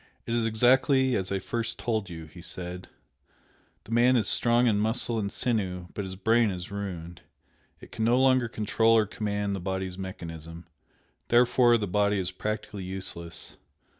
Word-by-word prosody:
"It 115 Hz, -, -3 dB
is 115 Hz, -1 st, +1 dB
exactly 130 Hz, +3 st, +3 dB
as 95 Hz, 0 st, -2 dB
I -, -, +1 dB
at 95 Hz, -, -3 dB
first 115 Hz, -1 st, -3 dB
told 110 Hz, -5 st, -2 dB
you," 80 Hz, -2 st, -8 dB
he 80 Hz, +3 st, -13 dB
said 90 Hz, 0 st, -5 dB, 1.0 s
"The -, -, -13 dB
man 120 Hz, +2 st, +4 dB
is 110 Hz, -5 st, +2 dB
strong 120 Hz, +1 st, +4 dB
in 105 Hz, -4 st, +3 dB
muscle 110 Hz, +1 st, 0 dB
and 100 Hz, -1 st, -2 dB
sinew, 95 Hz, -8 st, -2 dB
but 100 Hz, -, -4 dB
his 95 Hz, 0 st, -6 dB
brain 110 Hz, +3 st, +3 dB
is 90 Hz, -1 st, -6 dB
ruined. 90 Hz, -4 st, -6 dB, 0.6 s
It -, -, -14 dB
can 110 Hz, -, -3 dB
no 120 Hz, +2 st, +4 dB
longer 130 Hz, -2 st, +4 dB
control 115 Hz, +1 st, +2 dB
or 110 Hz, -, +4 dB
command 105 Hz, -1 st, -2 dB
the -, -, -4 dB
body's 95 Hz, 0 st, -4 dB
mechanism, 85 Hz, -3 st, -8 dB, 0.6 s
therefore 120 Hz, 0 st, +5 dB
the 105 Hz, -, -2 dB
body 105 Hz, +2 st, +1 dB
is 95 Hz, -1 st, -2 dB
practically 105 Hz, +1 st, -4 dB
useless. 90 Hz, -2 st, -5 dB
105 Hz, 170 wpm, -27 LUFS, 95-115 Hz, 1.0 s, therefore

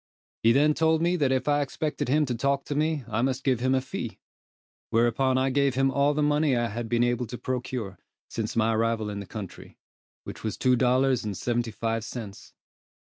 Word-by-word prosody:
He 115 Hz, -, +5 dB
then 145 Hz, +4 st, +4 dB
told 160 Hz, +1 st, +2 dB
me 175 Hz, +1 st, +2 dB
that 140 Hz, -5 st, +2 dB
if 130 Hz, 0 st, 0 dB
I 145 Hz, 0 st, +3 dB
expected 145 Hz, -1 st, -3 dB
him 150 Hz, +3 st, +3 dB
to 125 Hz, -, -2 dB
talk 140 Hz, +3 st, 0 dB
to -, -, -3 dB
me, 150 Hz, -2 st, 0 dB
I 110 Hz, 0 st, -1 dB
must 130 Hz, +1 st, -1 dB
give 130 Hz, -4 st, +2 dB
him 130 Hz, +2 st, +2 dB
a 130 Hz, -, +1 dB
fee; 130 Hz, -, -6 dB, 0.7 s
whereupon 120 Hz, +3 st, +2 dB
I 130 Hz, +1 st, +1 dB
gave 140 Hz, -1 st, +2 dB
him 135 Hz, 0 st, +2 dB
all 140 Hz, +1 st, +2 dB
the 150 Hz, -, +1 dB
money 150 Hz, -2 st, +2 dB
I 120 Hz, -1 st, 0 dB
had 115 Hz, +1 st, -5 dB
been 120 Hz, 0 st, +2 dB
able 120 Hz, 0 st, 0 dB
to 120 Hz, -, -6 dB
procure, 125 Hz, -7 st, -4 dB, 0.3 s
since 110 Hz, -2 st, -4 dB
my 115 Hz, 0 st, +2 dB
arrival 110 Hz, -1 st, 0 dB
in 100 Hz, -, -5 dB
the 100 Hz, -, -7 dB
country, 100 Hz, -1 st, -9 dB, 0.5 s
which -, -, -9 dB
was 110 Hz, -, -3 dB
two 125 Hz, -1 st, +3 dB
dollars 130 Hz, +1 st, +2 dB
and 105 Hz, -3 st, -4 dB
seventy 120 Hz, -1 st, -1 dB
five 115 Hz, +1 st, -2 dB
cents. 110 Hz, -3 st, -8 dB
125 Hz, 210 wpm, -26 LUFS, 115-140 Hz, 0.7 s, He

